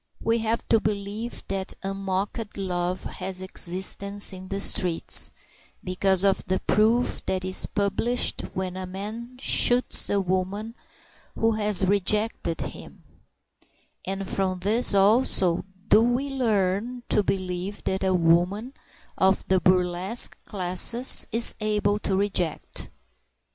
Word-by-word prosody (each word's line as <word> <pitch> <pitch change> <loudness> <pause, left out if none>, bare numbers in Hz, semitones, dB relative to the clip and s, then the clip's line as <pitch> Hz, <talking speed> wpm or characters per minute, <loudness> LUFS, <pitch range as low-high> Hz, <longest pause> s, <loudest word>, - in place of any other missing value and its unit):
We 230 +1 +1
have 225 +1 -2
to 225 - +4
believe 210 +2 -4
that 195 -1 -3
unmocked 195 +3 -4
love 180 -1 -3
has 185 0 -4
existence 190 +2 0
in 185 0 -9
the 195 +1 -3
streets, 180 -4 +3 0.5
because 190 +1 +1
of 195 -1 +2
the 190 0 0
proof 230 +4 +1
that 185 -1 -1
is 185 0 +1
published 205 +5 -1
when 185 -1 -4
a 185 0 -5
man 220 +6 -7
shoots 250 -1 +2
a 200 - +1
woman 190 +4 -3 0.6
who 225 0 +1
has 210 -3 +2
rejected 200 -2 0
him; - - -9 1.0
and 195 0 -4
from 185 -1 -2
this 210 +3 +4
also 195 -4 +3 0.3
do 220 - +5
we 245 +4 0
learn 230 -1 -1
to 210 - +3
believe 185 0 -4
that 190 0 -2
a 190 -1 +1
woman 180 +8 +1 0.5
of 190 0 +2
the 190 -1 +2
burlesque 185 +4 +2
classes 200 +6 +4
is 230 +1 +4
able 210 -1 0
to 195 - -2
reject. 195 -5 -2
195 Hz, 125 wpm, -24 LUFS, 185-215 Hz, 1.0 s, do